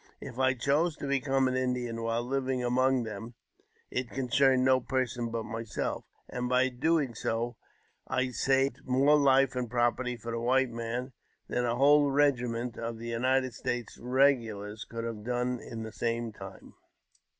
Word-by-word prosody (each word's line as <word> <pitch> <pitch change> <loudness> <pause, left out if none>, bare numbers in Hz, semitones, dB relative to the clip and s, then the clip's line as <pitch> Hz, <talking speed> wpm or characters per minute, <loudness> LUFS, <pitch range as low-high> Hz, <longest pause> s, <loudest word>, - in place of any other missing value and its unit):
If 130 -2 -8
I 130 0 +3
chose 145 +6 +1
to - - -6
become 135 -1 +1
an 130 - -1
Indian 125 -2 -1
while 115 +1 -1
livi 130 -1 -1
among 130 +1 +2
them, 110 +2 -7 0.6
it 125 -1 -2
concerned 130 0 +2
no 130 0 +5
person 125 -2 -2
but 115 0 -3
myself; 115 0 -4 0.2
and 125 0 -3
by 130 +1 +3
doi 140 +1 +1
so, 115 +2 -2 0.5
I 130 0 0
saved 135 +2 +1
more 135 +4 +4
life 135 -2 +4
and 125 -2 -2
property 120 +1 0
for 115 +1 -6
the 115 - -2
white 130 +2 +2
man 120 +3 -4 0.3
than 125 - -1
a! 120 0 0
whole 145 +2 +5
regiment 125 -4 +1
of 115 -1 -4
United 125 +2 0
States 120 +2 -4
regulars 115 -5 +1
could 115 0 -5
have 115 -2 -5
done 125 +1 -1
in 115 -1 -7
the 110 - -7
same 115 0 -2
time. 95 -1 -11
125 Hz, 160 wpm, -30 LUFS, 115-130 Hz, 0.6 s, no